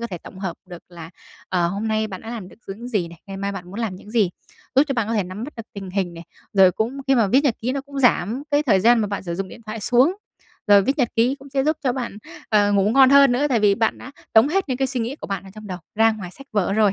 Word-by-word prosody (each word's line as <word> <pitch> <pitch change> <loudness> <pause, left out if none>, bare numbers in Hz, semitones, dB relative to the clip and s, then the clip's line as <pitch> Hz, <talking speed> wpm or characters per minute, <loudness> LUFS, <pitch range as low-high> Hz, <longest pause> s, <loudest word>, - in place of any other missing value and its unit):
có 235 - -3
thể 180 -6 -6
tổng 185 - -12
hợp 190 -3 -4
được 175 -1 -10
là, 170 -2 -10 0.4
ờ, 175 -2 +1
hôm 200 +4 -3
nay 220 0 0
bạn 190 -3 -8
đã 225 - -8
làm 215 -6 -6
được - - -17
những 220 +5 -7
gì 200 -8 -1
này, 170 -1 -13
ngày 195 -1 -7
mai 200 0 -3
bạn 190 -3 -7
muốn - - -11
làm 205 -5 -3
những 210 - -13
gì, 215 -6 +2 0.4
giúp 270 - +6
cho 275 - -1
bạn 225 -2 -1
có 230 - -1
thể 205 - +2
nắm 190 +6 -6
bắt 300 - -8
được 230 -1 -8
tình 195 -2 -7
hình 185 -3 -2
này. 165 0 -10 0.3
Rồi 190 -2 +6
cũng 235 +8 -2
khi 270 - +4
mà 230 -4 +3
viết 255 +8 +4
nhật 245 -6 +3
ký 250 +3 -1
nó 275 - -2
cũng 280 0 -9
giảm 245 0 +2
cái 290 0 +3
thời 200 -9 +3
gian 235 +3 +5
mà 210 - 0
bạn 200 -1 -4
sử 170 -2 -4
dụng 190 +1 -4
điện - - -12
thoại 215 0 -5
xuống. 250 - +3 0.5
Rồi 200 -1 +6
viết 275 +8 -1
nhật 245 -3 +2
ký 245 +4 +3
cũng 275 0 -13
sẽ 270 0 0
giúp 310 +1 +1
cho 250 - +2
bạn, 245 -5 -5 0.3
ờ, 205 -2 +3
ngủ 200 +1 +3
ngon 265 +1 +6
hơn 280 -2 +7
nữa 280 +4 +1
tại 235 -5 +2
vì 205 -1 +4
bạn 225 +1 0
đã 260 - -10 0.2
tống 225 +6 +6
hết 385 +4 +1
những 255 - -1
cái 270 +1 +1
suy 260 -2 -3
nghĩ 240 +6 -3
của - - -8
bạn 195 -1 -4
ở 190 - -12
trong 215 0 -10
đầu 185 -2 -5 0.2
ra 225 +1 +4
ngoài 190 -5 -7
sách 275 +7 -14
vở 195 -2 +1
rồi, 210 -2 +3
220 Hz, 310 wpm, -22 LUFS, 195-255 Hz, 0.5 s, hơn